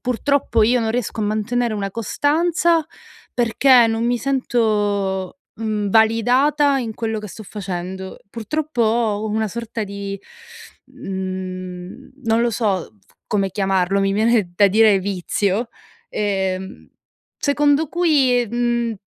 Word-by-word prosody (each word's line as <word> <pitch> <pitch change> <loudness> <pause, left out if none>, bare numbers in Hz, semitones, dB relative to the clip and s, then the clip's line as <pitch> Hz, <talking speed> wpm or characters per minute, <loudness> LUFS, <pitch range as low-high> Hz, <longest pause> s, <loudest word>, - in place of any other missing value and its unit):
purtroppo 250 -1 +1
io 245 +3 +4
non 225 -1 -1
riesco 240 -2 -2
a 210 - 0
mantenere 215 +2 -1
una 200 -1 -3
costanza 320 - +1 0.5
perché 240 +1 +4
non 225 +1 -1
mi 240 0 +1
sento, 210 -6 0 0.2
mhmm, 215 -2 -2
validata 255 +7 +3
in 225 -3 -4
quello 220 -1 -3
che 210 - -7
sto 215 +3 -10
facendo. 190 -2 -6
Purtroppo 245 +5 -2
ho 220 -2 +1
una 220 0 -1
sorta 230 +1 -5
di, 200 -1 -5 0.8
mhmm, 185 -1 -6
non 225 -1 +2
lo 240 0 +2
so 205 -5 0 0.2
f - - -30
come 195 -2 0
chiamarlo, 195 -1 +1
mi 195 0 +1
viene 215 -3 +2
da 200 +2 +5
dire 210 -1 +4
vizio, 200 +3 -1 0.4
ehm, 190 -2 -3 0.5
secondo 290 +1 +2
cui, 275 -8 +2
mhmm, 235 0 0
220 Hz, 125 wpm, -20 LUFS, 195-245 Hz, 0.8 s, da